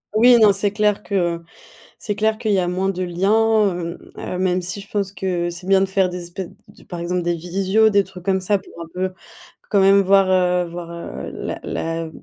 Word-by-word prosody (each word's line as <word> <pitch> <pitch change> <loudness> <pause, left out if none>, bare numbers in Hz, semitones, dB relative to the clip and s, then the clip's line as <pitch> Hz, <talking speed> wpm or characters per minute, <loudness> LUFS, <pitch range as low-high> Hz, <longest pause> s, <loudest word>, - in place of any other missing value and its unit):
Oui, 240 +2 +7
non, 210 -2 +6
c'est 200 +1 0
clair 210 0 +1
que, 175 -4 -1 0.6
c'est 205 - -3
clair 220 +1 +1
qu'il 220 -3 0
y 195 - +3
a 180 - 0
moins 185 +2 -1
de 185 -1 -2
liens, 210 +4 +2
hem, 170 0 -5 0.2
heu, 180 - -5
même 185 0 +1
si 185 +3 -4
je 200 - -11
pense 200 -2 -2
que 180 -3 -2
c'est 175 +2 -8
bien 195 0 +4
de 195 - +3
faire 190 0 +1
des 180 -1 -6
espèces 175 +1 -6 0.2
d - - -18
par 175 - -7
exemple 175 +1 -1
des 175 0 0
visios, 190 +6 +2
des 200 -1 +3
trucs 180 -1 -12
comme 190 0 +1
ça, 200 +2 +2
pour 195 - -15
un 165 - -7
peu, 185 +1 -2 0.6
quand 200 -2 +3
même 195 +1 +6
voir, 195 0 +4
heu, 180 -1 +2
voir, 170 0 -7
heu, 170 0 -7
la - - -5
la 165 0 -3
190 Hz, 225 wpm, -21 LUFS, 175-200 Hz, 0.6 s, Oui